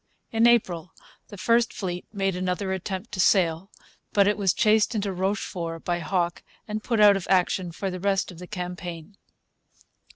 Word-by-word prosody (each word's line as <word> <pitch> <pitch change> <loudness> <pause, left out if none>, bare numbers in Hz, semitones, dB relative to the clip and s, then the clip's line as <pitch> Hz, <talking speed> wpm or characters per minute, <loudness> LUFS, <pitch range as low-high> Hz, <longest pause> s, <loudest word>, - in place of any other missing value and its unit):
In 225 0 +4
April 180 -8 +1 0.3
the 205 - -11
first 235 +4 +2
fleet 180 -3 -5
made 195 -3 -1
another 185 +1 -2
attempt 190 +3 -5
to 200 - -6
sail; 180 -1 +3 0.4
but 200 -1 +4
it 205 - +3
was 195 -3 +2
chased 215 +3 +3
into 200 -2 -1
Rochefort 180 -3 -3
by 175 -1 0
Hawke 175 +1 -1 0.3
and 215 0 -3
put 230 -3 0
out 205 -1 +7
of 195 - -4
action 185 -1 +2
for 190 +3 -4
the 185 - -5
rest 195 0 0
of 175 - -12
the 180 - -9
campaign. 180 -1 -6
190 Hz, 170 wpm, -25 LUFS, 180-205 Hz, 0.4 s, out